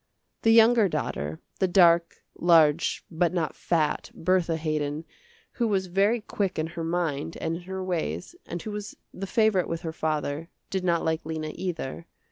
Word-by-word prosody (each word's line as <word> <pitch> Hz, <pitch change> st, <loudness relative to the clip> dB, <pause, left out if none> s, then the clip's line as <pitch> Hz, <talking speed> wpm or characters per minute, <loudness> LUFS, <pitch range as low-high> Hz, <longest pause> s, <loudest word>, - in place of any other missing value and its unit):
The 225 Hz, -, +3 dB
younger 225 Hz, -2 st, +6 dB
daughter, 75 Hz, -, -3 dB, 0.2 s
the 190 Hz, -, +3 dB
dark, 170 Hz, -2 st, +4 dB
large, 165 Hz, -2 st, +3 dB
but 175 Hz, +2 st, +1 dB
not 165 Hz, -3 st, -1 dB
fat, 160 Hz, -3 st, 0 dB
Bertha 170 Hz, -1 st, +1 dB
Haydon, 155 Hz, -1 st, -2 dB, 0.5 s
who 235 Hz, -, 0 dB
was 195 Hz, -3 st, +1 dB
very 200 Hz, +6 st, +2 dB
quick 200 Hz, -2 st, -2 dB
in 155 Hz, -, 0 dB
her 170 Hz, -, -4 dB
mind, 165 Hz, -2 st, -2 dB
and 165 Hz, +1 st, -2 dB
in -, -, -10 dB
her 190 Hz, 0 st, -4 dB
ways, 160 Hz, -, -3 dB
and 175 Hz, -, -4 dB
who 215 Hz, -, -5 dB
was 210 Hz, 0 st, -6 dB, 0.2 s
the 195 Hz, +1 st, -5 dB
favorite 215 Hz, -3 st, +2 dB
with 165 Hz, 0 st, -3 dB
her 165 Hz, -2 st, -4 dB
father, 155 Hz, 0 st, -2 dB, 0.2 s
did 190 Hz, -2 st, -1 dB
not 170 Hz, -2 st, +1 dB
like 160 Hz, 0 st, 0 dB
Lena, 155 Hz, -1 st, -4 dB
either. 170 Hz, -3 st, -5 dB
170 Hz, 170 wpm, -27 LUFS, 160-190 Hz, 0.5 s, younger